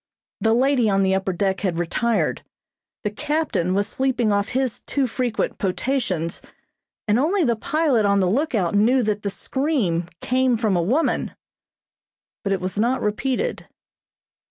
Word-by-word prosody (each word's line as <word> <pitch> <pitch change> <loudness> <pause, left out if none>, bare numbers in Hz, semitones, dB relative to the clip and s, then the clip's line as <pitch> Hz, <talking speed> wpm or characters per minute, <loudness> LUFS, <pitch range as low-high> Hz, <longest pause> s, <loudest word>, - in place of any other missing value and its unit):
The 225 0 +2
lady 255 -2 +3
on 195 -1 +2
the 190 0 +2
upper 190 0 0
deck 190 +1 0
had 180 -4 -1
retired. 220 +7 0 0.6
The 210 - -1
captain 215 - -1
was 200 +1 +2
sleeping 250 -3 0
off 200 0 +1
his 255 -1 -1
too 280 -2 +1
frequent 245 -1 -2
potations, 185 - -1 0.7
and 210 +3 +3
only 350 +7 +2
the 240 -5 +2
pilot 280 -1 +1
on 200 0 +3
the 185 - +2
lookout 215 - 0
knew 240 +5 +3
that 210 -1 -1
the 205 - -2
scream 200 - -1
came 255 -1 +1
from 215 -4 +1
a 175 - +2
woman; 255 - 0 1.1
but 200 - -1
it 195 -2 0
was 185 +2 -3
not 240 +4 +2
repeated. 255 - -2
220 Hz, 155 wpm, -22 LUFS, 195-260 Hz, 1.1 s, lady